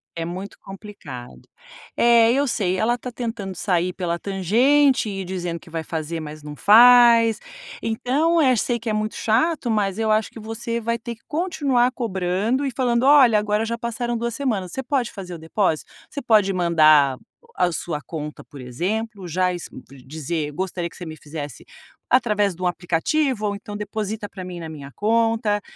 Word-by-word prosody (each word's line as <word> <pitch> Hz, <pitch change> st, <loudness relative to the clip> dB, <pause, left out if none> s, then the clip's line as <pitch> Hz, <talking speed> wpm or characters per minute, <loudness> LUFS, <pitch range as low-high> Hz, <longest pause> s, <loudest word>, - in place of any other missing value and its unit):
É 165 Hz, -, -3 dB
muito 185 Hz, +4 st, -7 dB
complicado. 195 Hz, -, -10 dB, 0.5 s
É, 235 Hz, -1 st, +5 dB
eu 280 Hz, +2 st, +1 dB
sei, 190 Hz, -6 st, 0 dB
ela 230 Hz, +5 st, +1 dB
está 250 Hz, +1 st, -7 dB
tentando 225 Hz, -6 st, -5 dB
sair 180 Hz, 0 st, 0 dB
pela 170 Hz, -2 st, -3 dB
tangente 240 Hz, -, +2 dB
e 195 Hz, -1 st, -4 dB
dizendo 175 Hz, -2 st, -4 dB
que -, -, -17 dB
vai 165 Hz, 0 st, -4 dB
fazer, 160 Hz, 0 st, -4 dB
mas 155 Hz, -1 st, -8 dB
não 150 Hz, 0 st, -8 dB
faz. 230 Hz, -, +7 dB, 0.4 s
Então, 280 Hz, +9 st, +1 dB
eh, 260 Hz, -4 st, +4 dB
sei 235 Hz, +2 st, 0 dB
que 230 Hz, 0 st, -4 dB
é -, -, 0 dB
muito 215 Hz, 0 st, -2 dB
chato, 250 Hz, +5 st, +1 dB
mas 205 Hz, -2 st, 0 dB
eu 220 Hz, -1 st, +1 dB
acho 215 Hz, 0 st, +2 dB
que -, -, -10 dB
você 225 Hz, +2 st, -4 dB
vai 230 Hz, +1 st, -1 dB
ter 235 Hz, 0 st, -6 dB
que 225 Hz, -, -32 dB
continuar 285 Hz, -7 st, +1 dB
cobrando 215 Hz, +3 st, -1 dB
e 270 Hz, -, -1 dB
falando: 240 Hz, -1 st, 0 dB
"Olha, 270 Hz, -6 st, +6 dB
agora 210 Hz, +1 st, 0 dB
já 235 Hz, +1 st, -3 dB
passaram 235 Hz, 0 st, -3 dB
2 235 Hz, 0 st, -3 dB
semanas, 215 Hz, -10 st, -2 dB
você 265 Hz, -, -4 dB
pode 255 Hz, -2 st, -1 dB
fazer 180 Hz, -3 st, -8 dB
o -, -, -7 dB
depósito?". 160 Hz, 0 st, -1 dB, 0.2 s
Você 285 Hz, -, -6 dB
pode 215 Hz, -5 st, +3 dB
mandar 155 Hz, -6 st, +4 dB, 0.4 s
a 180 Hz, -1 st, +2 dB
sua 165 Hz, -2 st, -4 dB
conta, 150 Hz, -1 st, -7 dB
por 140 Hz, -, -13 dB
exemplo, 190 Hz, -, -3 dB
já 180 Hz, +2 st, 0 dB
isso 175 Hz, -, -7 dB, 0.4 s
dizer: 155 Hz, +1 st, -4 dB
"Gostaria 175 Hz, +1 st, -3 dB
que -, -, -16 dB
você 180 Hz, -, -7 dB
me 160 Hz, -1 st, -7 dB
fizesse 145 Hz, -1 st, -8 dB, 0.5 s
através 210 Hz, -6 st, +2 dB
de 185 Hz, -, -8 dB
um -, -, 0 dB
aplicativo 210 Hz, -, 0 dB
ou 205 Hz, -, -1 dB
então 205 Hz, 0 st, -8 dB
deposita 210 Hz, 0 st, -4 dB
para 190 Hz, -2 st, -9 dB
mim 180 Hz, -1 st, -7 dB
na 165 Hz, -, -6 dB
minha 145 Hz, -3 st, -9 dB
conta". 225 Hz, -1 st, +1 dB
210 Hz, 180 wpm, -22 LUFS, 175-235 Hz, 0.5 s, faz